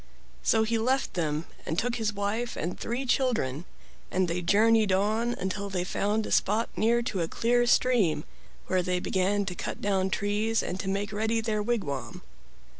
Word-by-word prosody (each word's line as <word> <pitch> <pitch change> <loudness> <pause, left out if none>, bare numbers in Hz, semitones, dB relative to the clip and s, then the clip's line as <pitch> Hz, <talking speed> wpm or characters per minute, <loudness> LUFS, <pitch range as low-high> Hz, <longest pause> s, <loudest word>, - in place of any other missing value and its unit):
So 220 -1 +3
he 225 +1 0
left 260 +4 0
them 155 -2 -1 0.2
and 160 - -3
took 245 +4 0
his 220 -2 0
wife 210 +4 -2
and 170 +4 -3
three 245 +4 -3
children, 220 - 0 0.4
and 185 0 +1
they 170 +1 -1
journeyed 215 +3 +4
on 215 +5 +1
until 200 +2 -3
they 185 -2 -1
found 210 +4 0
a - - -6
spot 215 +4 +2
near 235 +2 +2
to 200 -6 -2
a 165 - 0
clear 240 +6 +1
stream, 220 -13 +3 0.4
where 185 -1 +1
they 180 0 0
began 195 +3 0
to 185 - -3
cut - - -5
down 190 -2 +1
trees 205 +3 0
and 185 - -4
to 195 - -3
make 200 +2 -2
ready 220 +2 0
their 220 -1 -1
wigwam. 205 - -3
205 Hz, 180 wpm, -28 LUFS, 185-230 Hz, 0.4 s, journeyed